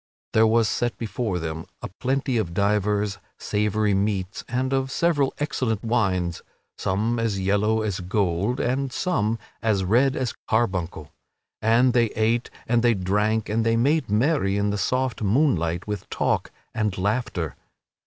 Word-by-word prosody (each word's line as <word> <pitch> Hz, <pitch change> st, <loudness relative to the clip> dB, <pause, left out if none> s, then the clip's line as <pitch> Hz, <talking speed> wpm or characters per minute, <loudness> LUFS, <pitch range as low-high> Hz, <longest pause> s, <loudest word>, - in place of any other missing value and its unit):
There 110 Hz, 0 st, +5 dB
was 115 Hz, 0 st, +3 dB
set 120 Hz, +2 st, -1 dB
before 110 Hz, -3 st, -2 dB
them 80 Hz, -1 st, -5 dB, 0.2 s
a -, -, -2 dB
plenty 130 Hz, -1 st, 0 dB
of 85 Hz, -6 st, -2 dB
divers 105 Hz, 0 st, +1 dB, 0.2 s
savory 105 Hz, 0 st, 0 dB
meats 95 Hz, -1 st, -1 dB
and 130 Hz, +2 st, -1 dB
of 135 Hz, 0 st, 0 dB
several 145 Hz, -5 st, +2 dB
excellent 125 Hz, -7 st, -1 dB
wines, 95 Hz, -7 st, 0 dB, 0.3 s
some 110 Hz, +5 st, 0 dB
as 110 Hz, -4 st, 0 dB
yellow 105 Hz, +3 st, +1 dB
as 100 Hz, -4 st, -2 dB
gold, 95 Hz, +4 st, 0 dB
and 130 Hz, +2 st, 0 dB
some 115 Hz, -, 0 dB, 0.2 s
as 105 Hz, -4 st, +1 dB
red 125 Hz, +8 st, +3 dB
as 130 Hz, -3 st, -2 dB, 0.2 s
carbuncle, 95 Hz, -9 st, -1 dB, 0.5 s
and 120 Hz, +3 st, +4 dB
they 120 Hz, -1 st, +4 dB
ate 115 Hz, +2 st, +1 dB, 0.2 s
and 120 Hz, 0 st, +3 dB
they 120 Hz, -1 st, +4 dB
drank 105 Hz, +4 st, 0 dB
and 110 Hz, +2 st, 0 dB
they 115 Hz, 0 st, +2 dB
made 135 Hz, +2 st, +2 dB
merry 105 Hz, -2 st, +2 dB
in 100 Hz, 0 st, +1 dB
the 105 Hz, -, -1 dB
soft 130 Hz, +2 st, 0 dB
moonlight 95 Hz, -, +1 dB
with 105 Hz, -3 st, -5 dB
talk -, -, 0 dB, 0.2 s
and 105 Hz, -3 st, -1 dB
laughter. 100 Hz, -, -1 dB
110 Hz, 150 wpm, -24 LUFS, 100-120 Hz, 0.5 s, There